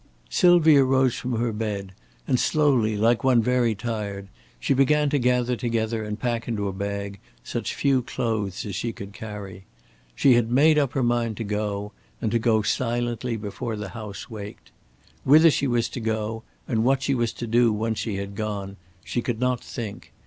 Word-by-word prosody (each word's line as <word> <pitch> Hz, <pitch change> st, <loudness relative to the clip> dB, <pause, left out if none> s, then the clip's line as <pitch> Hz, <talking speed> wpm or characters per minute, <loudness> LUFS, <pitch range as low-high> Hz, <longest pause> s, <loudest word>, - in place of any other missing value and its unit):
Sylvia 160 Hz, -6 st, +6 dB
rose 130 Hz, -1 st, +3 dB
from 125 Hz, 0 st, -4 dB
her 120 Hz, 0 st, 0 dB
bed, 105 Hz, -3 st, -3 dB, 0.4 s
and 125 Hz, -, +2 dB
slowly 130 Hz, -9 st, +2 dB
like 115 Hz, +3 st, +2 dB
one 130 Hz, -2 st, +4 dB
very 120 Hz, -1 st, +2 dB
tired 100 Hz, -3 st, -4 dB, 0.3 s
she -, -, +1 dB
began 145 Hz, +2 st, +3 dB
to 145 Hz, -, +2 dB
gather 125 Hz, 0 st, +2 dB
together 115 Hz, -2 st, -1 dB
and 105 Hz, 0 st, -5 dB
pack 115 Hz, 0 st, -2 dB
into 105 Hz, -4 st, -1 dB
a 95 Hz, -, -3 dB
bag 100 Hz, 0 st, -4 dB, 0.2 s
such -, -, -4 dB
few 135 Hz, -2 st, +2 dB
clothes 110 Hz, -6 st, -3 dB
as 100 Hz, -, -5 dB
she 115 Hz, +5 st, -3 dB
could 100 Hz, -1 st, -9 dB
carry. 100 Hz, -3 st, -8 dB, 0.5 s
She 135 Hz, -, +5 dB
had 120 Hz, -1 st, +2 dB
made 150 Hz, +4 st, +5 dB
up 140 Hz, -4 st, 0 dB
her 135 Hz, -, 0 dB
mind 120 Hz, -2 st, 0 dB
to -, -, -3 dB
go, 105 Hz, -1 st, -3 dB, 0.3 s
and 110 Hz, -, -1 dB
to 115 Hz, -, +2 dB
go 110 Hz, -2 st, +2 dB
silently 120 Hz, +1 st, -1 dB
before 110 Hz, +2 st, -4 dB
the 105 Hz, -2 st, -6 dB
house 105 Hz, -1 st, -8 dB
waked. 100 Hz, -, -9 dB, 0.5 s
Whither 155 Hz, +4 st, +7 dB
she 140 Hz, -, 0 dB
was 120 Hz, -2 st, +1 dB
to -, -, -6 dB
go, 110 Hz, 0 st, -2 dB, 0.3 s
and 110 Hz, -2 st, +1 dB
what 135 Hz, +2 st, +2 dB
she 140 Hz, -, +1 dB
was 120 Hz, -3 st, 0 dB
to 120 Hz, -, -5 dB
do 115 Hz, 0 st, +3 dB
once 110 Hz, +1 st, -1 dB
she 110 Hz, -4 st, -2 dB
had 100 Hz, 0 st, -5 dB
gone, 100 Hz, -2 st, -4 dB, 0.3 s
she 120 Hz, -, -2 dB
could 120 Hz, -2 st, -3 dB
not 125 Hz, -1 st, 0 dB
think. 110 Hz, -5 st, -7 dB
115 Hz, 185 wpm, -24 LUFS, 105-125 Hz, 0.5 s, Whither